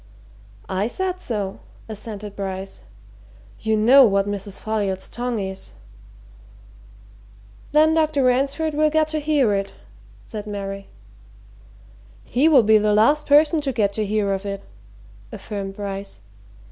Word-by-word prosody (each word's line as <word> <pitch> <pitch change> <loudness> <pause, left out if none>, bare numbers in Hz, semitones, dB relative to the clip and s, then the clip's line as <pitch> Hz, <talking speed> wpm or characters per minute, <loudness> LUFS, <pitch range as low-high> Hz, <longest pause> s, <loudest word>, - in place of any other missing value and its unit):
"I 190 +3 -1
said 370 +8 -3
so," 210 - -3 0.3
assented 210 -1 -7
Bryce. 195 -1 -5 0.8
"You 220 0 0
know 255 +6 +7
what 200 -4 +3
Mrs. 200 -1 -5
Folliot's 200 -4 -2
tongue 245 -1 -3
is." 190 -1 -6 2.0
"Then 310 +1 +4
Dr. 310 -3 +2
Ransford 275 +5 +1
will 305 +1 +3
get 310 0 +1
to 310 0 -1
hear 290 -7 +2
of 195 0 -1
it," - - -18 0.5
said 210 -1 -7
Mary. 195 -1 -5 1.4
"He 275 +7 +2
will 275 -7 +6
be 215 0 +5
the 210 0 +2
last 290 +8 +3
person 300 +2 +4
to 280 -2 -1
get 205 -5 0
to 215 - -1
hear 205 -1 0
of 195 0 -3
it," 200 -1 -5 0.7
affirmed 195 -3 -6
Bryce. 195 - -6
215 Hz, 135 wpm, -22 LUFS, 200-285 Hz, 2.0 s, know